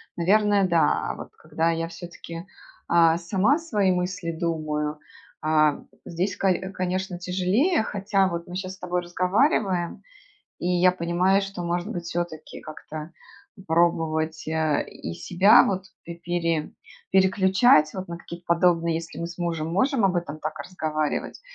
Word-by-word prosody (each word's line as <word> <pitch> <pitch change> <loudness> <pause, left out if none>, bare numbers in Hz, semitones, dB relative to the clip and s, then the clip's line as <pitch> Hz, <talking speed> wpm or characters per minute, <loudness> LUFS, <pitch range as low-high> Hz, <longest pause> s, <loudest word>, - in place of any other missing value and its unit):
Наверное, 200 +2 +3
да. 165 -4 +2
А - - -3
вот - - -9
когда 160 +2 -1
я 165 0 -2
всё-таки, 170 0 -9 0.4
а, 165 -1 +4
сама 195 - +2
свои 210 - +1
мысли 180 -1 -2
думаю, 155 -3 -2 0.4
а, 155 -1 +2 0.2
здесь, 175 +4 -2
кои 190 0 0
конечно, 185 0 -2
тяжелее. 190 - +1
Хотя 195 -2 +1
вот 170 +1 -5
мы 180 - -7
щас 185 0 -4
с - - -24
тобой 180 0 -2
разговариваем, 185 - 0 0.6
и 175 - -2
я 180 0 +4
понимаю, 180 +3 +1
что, 195 -2 -5
может 175 +1 -2
быть, 175 - -4
всё-таки 170 -2 -5
как-то 155 +1 -8 0.6
пробовать, 160 -1 +1
э, 160 -2 0
и 85 - -7
себя, 190 - +5
вот, 190 -1 -1 0.2
п 170 - -7
пере 170 -2 -2 0.4
переключать, 190 -3 +4
вот 190 -1 -6
на 170 0 -6
какие-то 170 0 -10
подобные 170 -1 +2
Если 165 0 -6
мы 170 - -3
с 170 +1 -10
мужем 165 -3 -2
можем 225 - +2
об 185 - +1
этом 170 -3 -3
так 155 0 -4
разговаривать, 155 - -3
175 Hz, 150 wpm, -25 LUFS, 165-190 Hz, 0.6 s, себя